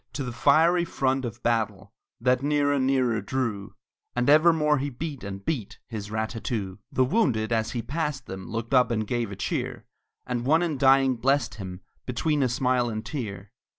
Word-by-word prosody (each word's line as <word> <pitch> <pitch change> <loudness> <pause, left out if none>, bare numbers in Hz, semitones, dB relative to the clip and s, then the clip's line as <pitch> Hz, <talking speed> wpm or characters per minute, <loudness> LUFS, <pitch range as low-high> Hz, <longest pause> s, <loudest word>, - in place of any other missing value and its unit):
To 140 - -3
the 125 - -4
fiery 160 +9 +4
front 135 -5 0
of 120 0 -7
battle, 105 -4 -1 0.3
That 125 +2 +2
nearer, 145 0 +2
nearer 130 -4 +2
drew, 110 -4 -3 0.4
And 125 +3 +3
evermore 155 -1 +5
he 140 +2 -2
beat, 140 0 -6
and 100 -1 -7
beat 130 -11 -3
His 105 -4 -6
rat 110 +1 -2
tat 115 - -7
too! 100 -5 -3
The 130 - +3
wounded 125 - +1
as 110 0 0
he 120 -2 -3
passed 150 -4 -3
them 95 0 -8
Looked 115 +2 -4
up 125 -3 +5
and 110 -2 -1
gave 120 -1 -2
a - - -5
cheer; 100 - -3 0.4
And 125 -1 -2
one 160 +6 +3
in 155 -6 -2
dying 135 -1 +5
blessed 125 -4 +1
him, 95 -3 -7 0.3
Between 145 +4 0
a 130 - +2
smile 125 -1 +1
and 110 0 -4
tear. 105 -7 -5
125 Hz, 185 wpm, -26 LUFS, 110-140 Hz, 0.4 s, evermore